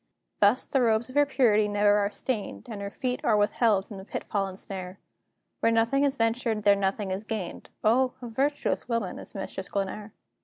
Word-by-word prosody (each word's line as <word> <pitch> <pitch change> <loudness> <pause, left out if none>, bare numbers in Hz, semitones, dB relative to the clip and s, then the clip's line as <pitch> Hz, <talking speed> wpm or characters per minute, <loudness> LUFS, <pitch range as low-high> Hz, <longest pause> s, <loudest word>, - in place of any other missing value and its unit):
Thus 210 +5 +4
the 270 - +1
robes 230 0 +2
of 255 - -11
her 290 0 +5
purity 220 -6 +3
never 205 0 +3
are 200 -1 +1
stained, 225 +1 -4
And 215 -4 -6
her 200 - -4
feet 250 +3 -3
are 215 - +3
withheld 205 -1 +2
from 205 - -9
the 190 - -8
pitfall 195 0 -2
and 190 -1 -8
snare; 185 -1 -7 0.6
Where 230 - +3
nothing 230 +5 +2
is 280 -1 +1
ventured, 225 -1 0
there 205 -1 +6
nothing 195 0 -1
is 190 +3 -3
gained: 215 -5 -5
O, 250 +4 +3
a 245 - -7
virtuous 275 +3 -1
woman 230 -6 -2
is - - -9
Mistress 195 -1 -5
Glenare! 205 +2 -3
215 Hz, 195 wpm, -27 LUFS, 200-245 Hz, 0.6 s, there